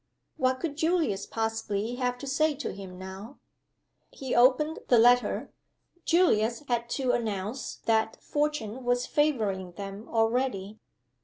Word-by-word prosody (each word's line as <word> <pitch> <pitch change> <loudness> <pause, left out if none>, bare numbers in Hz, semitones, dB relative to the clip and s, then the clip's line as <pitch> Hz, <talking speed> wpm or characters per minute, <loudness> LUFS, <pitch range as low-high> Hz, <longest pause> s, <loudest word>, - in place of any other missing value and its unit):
What 260 -3 +1
could 300 -4 -4
Julius 315 - +1
possibly 225 -1 -2
have 250 -1 -1
to 265 - -8
say 295 +3 +1
to 285 - -4
him 190 -2 -9
now? 190 +7 -9 0.7
He 265 -2 -5
opened 260 +6 +4
the 245 - +5
letter. 245 +2 +4 0.5
Julius 240 -8 +3
had 235 -1 -1
to 260 -3 +1
announce 215 +2 -3
that 220 -1 +2
Fortune 290 -6 -2
was 245 0 +1
favoring 210 -12 0
them 200 +2 -8
already. 225 -3 0
240 Hz, 130 wpm, -28 LUFS, 210-270 Hz, 0.7 s, the